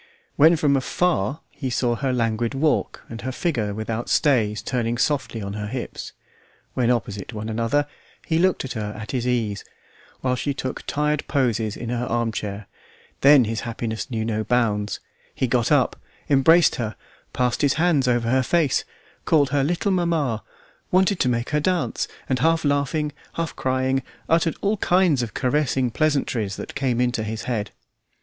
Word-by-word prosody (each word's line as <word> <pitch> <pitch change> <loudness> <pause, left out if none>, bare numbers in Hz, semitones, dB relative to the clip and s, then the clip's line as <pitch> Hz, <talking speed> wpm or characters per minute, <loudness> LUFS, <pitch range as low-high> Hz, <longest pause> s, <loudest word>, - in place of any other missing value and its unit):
When 160 +4 +6
from 145 -3 +2
afar 145 - 0
he 135 -3 -4
saw 120 -1 +1
her 130 +2 -1
languid 115 0 0
walk, 150 +3 0
and 115 0 -8
her 130 - -3
figure 125 - -1
without 110 +2 -4
stays 110 -8 +2
turning 120 -2 -1
softly 135 -5 0
on 100 0 -4
her 105 0 -4
hips; 125 +3 -6 0.6
when 120 -2 +1
opposite 105 -3 -2
one 110 +1 -5
another 115 +6 +1 0.4
he 160 0 +1
looked 185 -5 +2
at 130 - -5
her 105 -2 -4
at 110 - -6
his 125 -2 -1
ease, 110 -5 -1 0.6
while 130 -1 +1
she 140 +2 -2
took 130 -2 -4
tired 150 0 0
poses 115 -6 0
in 115 - -5
her 125 0 -2
armchair, 110 -3 -2 0.5
then 140 -3 +7
his 110 0 -2
happiness 115 +1 -4
knew 110 -3 -2
no 110 -1 -1
bounds; 105 -4 0 0.4
he - - +1
got 120 0 +1
up, 140 -5 +3 0.4
embraced 160 +5 +5
her, 110 -3 -3 0.4
passed 125 -1 0
his 140 -2 +3
hands 160 -5 +2
over 120 -2 +1
her 130 0 +4
face, 155 +1 +2 0.4
called 145 -4 +3
her 140 -1 +2
little 175 +7 0
mamma, 165 - 0 0.5
wanted 190 0 +3
to 125 - +2
make 120 0 -1
her 150 - +2
dance, 180 +2 0 0.2
and 130 -1 0
half 165 0 +2
laughing, 145 +1 0 0.2
half 165 -1 -3
crying, 130 +1 0 0.3
uttered 165 0 +2
all 205 +2 +1
kinds 180 -8 +3
of 115 -3 -5
caressing 130 -2 +1
pleasantries 130 -8 0
that - - -7
came 130 -3 0
into 125 -2 +1
his 110 0 -4
head. 110 -4 -2
125 Hz, 170 wpm, -23 LUFS, 115-150 Hz, 0.6 s, then